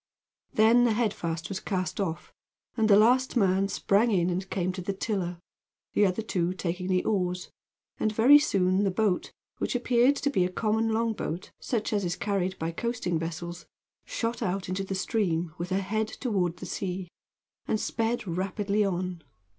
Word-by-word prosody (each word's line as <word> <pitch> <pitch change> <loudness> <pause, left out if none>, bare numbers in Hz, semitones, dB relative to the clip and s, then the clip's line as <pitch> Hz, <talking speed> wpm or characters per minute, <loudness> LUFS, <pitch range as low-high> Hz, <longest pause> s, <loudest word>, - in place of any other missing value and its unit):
Then 230 +3 +5
the 230 - +3
head 220 -2 +1
fast 165 -1 -4
was 195 -2 -4
cast 185 -1 -2
off, 170 -5 -3 0.4
and 225 -2 +2
the 200 - +8
last 250 +5 +4
man 195 -2 +3
sprang 200 +3 +2
in 180 -4 +2
and 185 +2 -3
came 185 -1 -1
to 185 0 -6
the 195 +3 -2
tiller, 190 -4 -2 0.6
the 205 - +4
other 190 +4 -2
two 180 -4 -1
taking 180 0 -3
the 185 -1 +2
oars, 180 -3 -1 0.5
and 215 - +1
very 245 +7 +7
soon 190 -8 +2
the 200 - +2
boat, 190 -1 0 0.3
which - - -1
appeared 245 +2 +3
to 285 0 -1
be 185 - +2
a 180 - 0
common 220 +4 0
long 225 +1 +1
boat, 175 -4 -5
such 225 -3 -2
as 205 -1 +1
is 175 -1 -1
carried 190 -1 -1
by 165 +1 -2
coasting 205 -3 -2
vessels, 170 +1 -5 0.4
shot 230 +1 -3
out 190 +1 -1
into 185 +2 -2
the 195 0 -4
stream, 175 -5 0
with 175 +1 -3
her 190 - +1
head 215 +3 -1
toward 195 -8 -1
the - - -7
sea, 185 -1 -4 0.6
and 215 - +1
sped 225 -1 -1
rapidly 195 +4 0
on. 180 -2 -2
195 Hz, 180 wpm, -28 LUFS, 180-220 Hz, 0.6 s, the